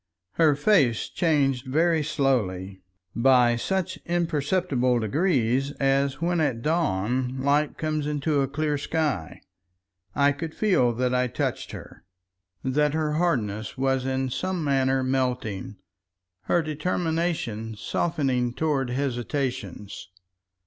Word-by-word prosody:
Her 155 +1 +3
face 145 - +2
changed 140 -6 +1
very 160 +4 +2
slowly—by 115 - +1
such 185 +8 -2
imperceptible 155 -6 +1
degrees 135 - +1
as 135 0 +1
when 175 +1 0
at 125 -6 -1
dawn 130 - 0
light 145 +2 +1
comes 155 -2 -2
into 150 0 0
a 135 - +1
clear 145 +1 -1
sky. 145 - -2 0.7
I 140 0 +4
could 155 +3 -6
feel 180 - +3
that 125 +2 0
I 125 0 +2
touched 120 - -3
her, - - -10 0.6
that 150 +3 +1
her 155 -1 0
hardness 115 - -1
was 135 0 +1
in 130 -1 -1
some 185 +3 -2
manner 135 -2 +2
melting, 125 -7 -2 0.7
her 175 - +2
determination 155 -8 -2
softening 125 0 -1
toward 145 -5 0
hesitations. 125 - -3
135 Hz, 110 wpm, -25 LUFS, 125-155 Hz, 0.7 s, I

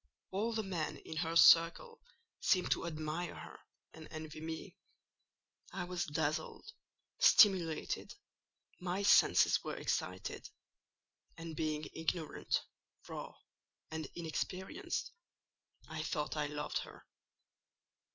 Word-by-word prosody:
All 210 +5 0
the 220 -1 -1
men 175 -6 -3
in 160 - -8
her 165 0 -1
circle 170 - +6 0.4
seemed 185 -2 +2
to - - +1
admire 155 +1 -3
her - - -10 0.3
and 160 -1 -11
envy 155 0 -7
me. 160 0 -6 1.0
I 185 -1 -3
was 180 0 -2
dazzled, 150 0 -2 0.5
stimulated: 190 - +4 0.6
my 180 +2 -2
senses 200 - +5
were - - -4
excited; 90 0 -3 0.9
and 165 -1 -7
being 155 -1 -1
ignorant, 160 -1 -1 0.4
raw, - - -7 0.6
and 160 -2 -4
inexperienced, 185 - -3 0.8
I - - -4
thought 150 -2 -2
I 150 -1 0
loved 150 0 -3
her. - - -10
165 Hz, 105 wpm, -35 LUFS, 155-185 Hz, 1.0 s, circle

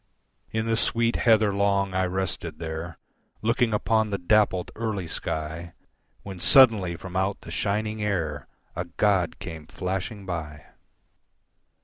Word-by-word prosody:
In 110 0 -1
the 115 0 +1
sweet 115 +1 +1
heather 110 -3 +4
long 100 -1 +1
I 95 0 +1
rested 95 -3 -3
there 80 +1 -5 0.5
Looking 115 +1 +2
upon 110 +1 +1
the 100 - -1
dappled, 95 -1 +2
early 105 -6 -3
sky, 80 +2 -4 0.5
When 95 -2 -8
suddenly, 105 -8 +6
from 90 +1 -9
out 95 +2 0
the - - -10
shining 105 +1 -1
air 80 -9 -2 0.3
A 90 +1 -2
god 90 0 +1
came 80 -5 -8
flashing 95 +4 -4
by. 75 -5 -5
95 Hz, 130 wpm, -26 LUFS, 85-110 Hz, 0.5 s, suddenly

